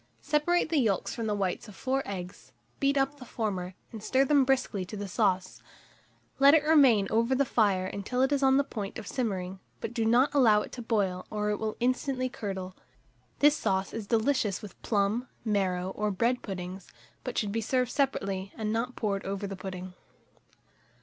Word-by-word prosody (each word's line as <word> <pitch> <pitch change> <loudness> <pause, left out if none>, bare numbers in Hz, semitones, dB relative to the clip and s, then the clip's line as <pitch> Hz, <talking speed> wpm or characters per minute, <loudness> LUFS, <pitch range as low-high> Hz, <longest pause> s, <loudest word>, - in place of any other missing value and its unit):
Separate 315 +3 +2
the 315 -2 +2
yolks 210 -7 0
from 230 -2 -3
the 210 - 0
whites 195 0 -2
of 210 - -12
4 265 +4 -1
eggs; 185 -2 -7 0.3
beat 280 0 +2
up 275 +1 0
the - - -9
former, 190 -7 -3 0.2
and 220 -3 -8
stir 260 +5 +2
them 285 0 +4
briskly 255 -7 +1
to 200 +4 -7
the 205 0 -4
sauce; 185 0 0 0.8
let 280 +2 +8
it 305 - +4
remain 275 -10 +5
over 230 +4 +2
the 280 +1 +2
fire 200 -6 +2
until 205 +7 -1
it 265 - +2
is 285 -1 +2
on 265 0 +5
the 280 - +4
point 210 -7 -6
of 220 - -7
simmering; 190 -6 -3 0.2
but 230 - -5
do 230 -2 0
not 240 +6 +3
allow 225 -7 +5
it - - -10
to 250 - -7
boil, 200 -6 -1
or 210 0 -1
it 210 - -2
will 220 -1 -3
instantly 255 +1 0
curdle. 190 -5 -5 0.7
This 295 +1 +6
sauce 190 -8 -1
is 225 -3 -5
delicious 225 -3 +1
with 205 - -11
plum, 215 +4 0 0.2
marrow, 190 -3 0
or 210 +2 -1
bread 235 +6 +1
puddings; 185 -1 -6 0.4
but - - -5
should 205 -2 0
be 225 +2 -1
served 250 +2 0
separately, 195 -8 -1
and 215 -1 -1
not 240 +3 -2
poured 200 -3 -1
over 200 +1 -3
the 195 0 -5
pudding. 185 -1 -7
220 Hz, 190 wpm, -29 LUFS, 195-255 Hz, 0.8 s, let